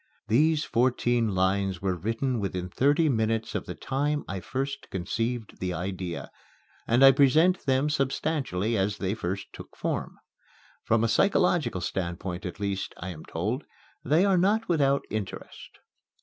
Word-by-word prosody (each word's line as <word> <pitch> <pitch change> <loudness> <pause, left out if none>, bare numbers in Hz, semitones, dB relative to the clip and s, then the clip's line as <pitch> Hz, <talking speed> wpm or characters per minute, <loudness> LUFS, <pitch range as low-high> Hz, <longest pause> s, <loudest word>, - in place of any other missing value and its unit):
These 155 +6 +3
fourteen 120 -3 +1
lines 95 0 +1
were 95 0 -1
written 115 - -1
within 90 -2 -3
thirty 145 - +3
minutes 110 -3 0
of - - -3
the - - -5
time 145 +2 -1
I 95 - -4
first 135 +9 -4
conceived 115 +5 -3
the 90 -1 -2
idea; 90 -1 -4 0.6
and 120 +4 +5
I 135 - +10
present 155 +7 +3
them 135 +2 +3
substantially 135 - -1
as 100 0 0
they 95 -1 -1
first 95 -2 -4
took - - -12
form. - - -3 0.7
From 110 0 +2
a - - +3
psychological 175 - +2
standpoint 90 0 -3
at 90 - -8
least, 100 -1 -3
I 95 - -6
am 80 -4 -8
told, 105 - -2 0.4
they 155 +8 +3
are 190 -3 +3
not 210 +5 +2
without 140 -5 +2
interest. 105 -3 -6
115 Hz, 150 wpm, -27 LUFS, 95-140 Hz, 0.7 s, I